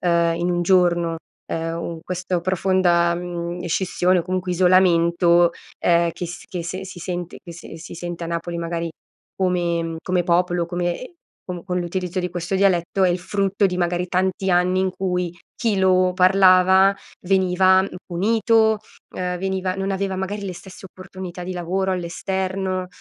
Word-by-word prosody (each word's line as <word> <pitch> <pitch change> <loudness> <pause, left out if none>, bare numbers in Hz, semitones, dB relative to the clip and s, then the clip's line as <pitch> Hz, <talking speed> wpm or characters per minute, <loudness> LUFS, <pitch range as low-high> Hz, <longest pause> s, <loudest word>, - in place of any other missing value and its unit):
ehm, 170 -1 +2
in 175 +1 -1
un 175 0 0
giorno, 175 -2 +3 0.3
ehm, 165 0 -3
u 170 -1 -5
questo 180 0 -2
profonda, 180 -1 +2
mhmm, 175 0 -5
scissione 180 +1 +1
o 170 - 0
comunque 185 +1 -3
isolamento, 175 -1 +4 0.3
ehm, 170 -1 +3
che 175 - -5
s 175 +1 -8
che 175 -2 -5
se 185 +2 -5
si 185 -1 -9
sente 175 -1 -5
che 175 - -10
se 165 -1 -10
si 160 - -9
sente 175 0 -5
a - - -4
Napoli, 170 +1 -3
magari, 170 0 -3 0.5
come 175 -2 0
mhmm, 165 0 -4
come 180 -1 0
popolo, 175 0 +1
come 175 0 -2
ehm, 255 +8 -10 0.3
com 180 -2 -7
con 180 -1 -1
l'utilizzo 180 +1 -3
di 180 - -2
questo 175 +2 -3
dialetto, 190 -1 +2
è 185 - +5
il 175 - 0
frutto 195 +2 0
di, 180 -1 -2
magari, 175 0 0
tanti 185 +1 0
anni 180 +1 +2
in 190 0 +1
cui 180 -2 -2 0.2
chi 220 -4 0
lo 185 -1 +3
parlava, 190 +1 +5 0.3
veniva, 190 0 +4
mhmm, 195 - -3 0.2
punito, 220 +4 +2 0.4
uhm, 180 0 -2
veniva 190 0 -2
non 195 0 -2
aveva, 195 0 -1
magari, 195 +2 -4
le 190 - -4
stesse 190 +2 -11
opportunità 185 -1 -9
di 185 +1 -4
lavoro 185 +2 -1
all'esterno 185 +1 -2
180 Hz, 170 wpm, -22 LUFS, 175-190 Hz, 0.5 s, è